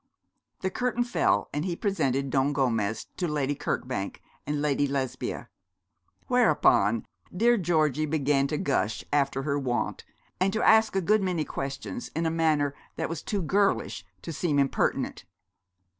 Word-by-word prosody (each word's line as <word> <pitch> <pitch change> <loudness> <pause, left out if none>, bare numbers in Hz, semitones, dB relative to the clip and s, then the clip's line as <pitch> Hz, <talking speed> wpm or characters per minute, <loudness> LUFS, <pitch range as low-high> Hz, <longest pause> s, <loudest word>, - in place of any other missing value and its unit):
The 190 - -1
curtain 245 +1 0
fell, 240 - +1
and 145 +1 -1
he 175 -1 -2
presented 140 - 0
Don 135 +2 +2
Gomez 115 -6 0
to 180 - -1
Lady 145 -2 0
Kirkbank 125 -7 -3 0.3
and 150 0 -1
Lady 145 -1 +1
Lesbia; 135 -2 -3 0.8
whereupon 105 +3 +3 0.3
dear 235 +6 +3
Georgie 155 - +1
began 140 -2 +2
to 150 - -2
gush, 110 -8 -1
after 140 -2 +1
her 145 0 0
wont, 125 -3 -2 0.4
and 190 +1 +2
to 220 - 0
ask 220 -2 +5
a 195 - +2
good 210 +4 +3
many 180 -5 0
questions 135 -6 -5
in 165 +1 0
a 160 - +1
manner 155 -3 +2 0.2
that 160 - -2
was 165 -2 -4
too 200 -3 -2
girlish 200 +5 +1 0.2
to 165 - -5
seem 155 -1 0
impertinent. 140 -1 0
150 Hz, 150 wpm, -27 LUFS, 135-180 Hz, 0.8 s, ask